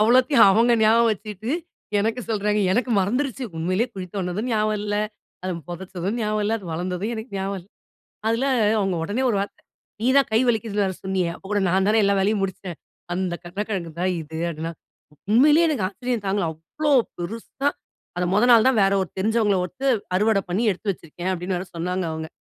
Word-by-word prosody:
அவ்வளத்தையும் 245 +2 +6
அவங்க 230 +5 +4
ஞாபகம் 230 +1 +5
வச்சுட்டு 210 +2 -6 0.5
எனக்கு 225 +4 0
சொல்றாங்க. 210 0 +1
எனக்கு 245 +4 0
மறந்துருச்சு. 255 +6 -1
உண்மையிலயே 185 +9 0
குளித்தோண்டுனதும் 190 +4 -3
ஞாபகம் 215 -1 +1
இல்ல, 205 0 -1 0.5
அது 185 - -1 0.2
புதைச்சதும் 190 +4 -4
ஞாபகம் 215 0 0
இல்ல, 215 - 0
அது 195 - -13
வளர்ந்ததும் 180 +6 -2
எனக்கு 220 +2 -7
ஞாபகம் 195 0 -2
இல்ல. 180 - -21 0.6
அதுல 230 +4 +1 0.3
அவங்க 195 -3 0
உடனே 215 +9 -1
ஒரு 210 - +1
வார்த்தை, 200 - -5 0.4
"நீ 235 - +1
தான் 275 - +4
கை 220 - +4
வலிக்குதுன்னு 215 -3 0
வேற 190 - -2
சொன்னியே, 190 -2 0
அப்ப - - -17
கூட 205 - +2
நான் 190 +2 +2
தானே 220 +1 +4
எல்லா 200 0 +3
வேலையும் 205 +1 +1
முடிச்சேன். 185 -3 -5 0.4
அந்த 185 -2 -1
கருணக்கிழங்கு 190 -1 -4
தான் 185 0 +2
இது" 160 +1 -7
அப்படின்னா. 165 +1 -5 0.6
உண்மையிலயே 300 +8 +6
எனக்கு 270 -11 0
ஆச்சரியம் 245 0 -3
தாங்கல. 195 -1 +1
அவ்வளோ 230 - -3 0.3
பெருசா! 225 +9 -3 0.5
"அத 180 - 0
மொத 210 - +4
நாள் 235 +1 +7
தான் 250 -4 +2
வேற 195 0 +3
ஒரு 185 - -10
தெரிஞ்சவங்களை 215 -1 +2
விட்டு 265 +10 -4 0.3
அறுவடை 210 -1 +2
பண்ணி 195 +6 0
எடுத்து 200 +2 -2
வச்சிருக்கேன்" 175 +1 -5
அப்படீன்னு 180 +1 -2
வேற 185 +1 -6
சொன்னாங்க 180 +2 -2
அவங்க. 160 0 -5
205 Hz, 175 wpm, -23 LUFS, 185-225 Hz, 0.6 s, நாள்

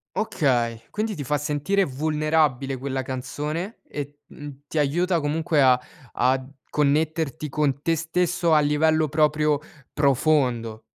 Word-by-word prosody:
Okay. 120 - 0
Quindi 215 -1 -2
ti 145 - -5
fa 150 +3 0
sentire 150 +7 0
vulnerabile 150 -2 0
quella 130 0 -3
canzone 150 - -4
e 145 0 -6
t - - -32
uhm, 145 -1 -10
ti 160 - -5
aiuta 170 +5 +1
comunque 155 0 +1
a 125 -1 +5 0.3
ad 130 +2 +1 0.2
connetterti 155 +1 0
con 140 -1 0
te 165 +1 +1
stesso 170 +1 0
a 155 - +6
livello 155 +2 +2
proprio 150 0 +2 0.3
profondo. 130 -6 +1
150 Hz, 130 wpm, -24 LUFS, 135-160 Hz, 0.3 s, a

